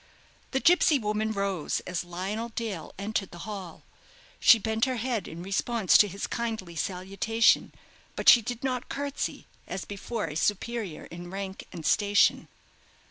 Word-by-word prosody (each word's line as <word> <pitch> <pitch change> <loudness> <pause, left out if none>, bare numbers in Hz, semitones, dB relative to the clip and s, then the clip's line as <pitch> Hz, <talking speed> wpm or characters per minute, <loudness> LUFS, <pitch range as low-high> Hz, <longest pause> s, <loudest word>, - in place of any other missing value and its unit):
The 265 - 0
gipsy 335 -1 +5
woman 215 -1 -1
rose 200 -6 -1
as 180 -1 -3
Lionel 190 +6 -4
Dale 220 -7 -5
entered 200 -1 -2
the 175 - -9
hall. 195 -6 -7 0.6
She 230 - +8
bent 220 +1 0
her 260 -1 -1
head 235 -4 -2
in 170 +2 -8
response 200 +1 +1
to 210 - +6
his 200 +1 -4
kindly 220 -7 -4
salutation; 195 +6 +1 0.4
but - - -4
she 240 - +10
did 245 +2 -5
not 255 -2 -2
curtsey 285 0 -3 0.2
as 190 - -5
before 205 +2 -4
a 150 -2 -6
superior 205 0 -2
in 175 +1 -9
rank 195 0 -6
and 165 -3 -8
station. 205 0 +3
205 Hz, 150 wpm, -28 LUFS, 185-230 Hz, 0.6 s, she